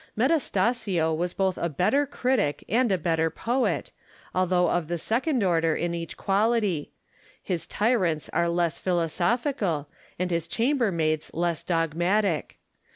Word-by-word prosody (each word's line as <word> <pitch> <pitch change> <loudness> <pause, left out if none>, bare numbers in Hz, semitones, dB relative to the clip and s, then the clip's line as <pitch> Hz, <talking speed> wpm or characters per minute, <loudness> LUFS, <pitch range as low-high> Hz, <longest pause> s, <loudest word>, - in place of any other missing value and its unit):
Metastasio 220 - +1
was 175 +2 -2
both 190 -2 0
a 170 - 0
better 225 - +1
critic 250 - 0
and 235 +3 +2
a 190 - +3
better 165 -2 +1
poet, 245 +9 -1 0.4
although 180 -1 +2
of 175 -2 0
the 175 +1 -2
second 245 - 0
order 165 -3 +2
in 175 0 -1
each 170 -1 -5
quality; 200 -5 +1 0.5
his 175 -3 -4
tyrants 190 -9 +1
are 170 0 +1
less 170 -1 0
philosophical, 175 - 0 0.3
and 180 0 -2
his 170 -1 -1
chambermaids 195 - 0
less 170 -1 0
dogmatic. 175 +2 0
180 Hz, 130 wpm, -26 LUFS, 165-225 Hz, 0.5 s, a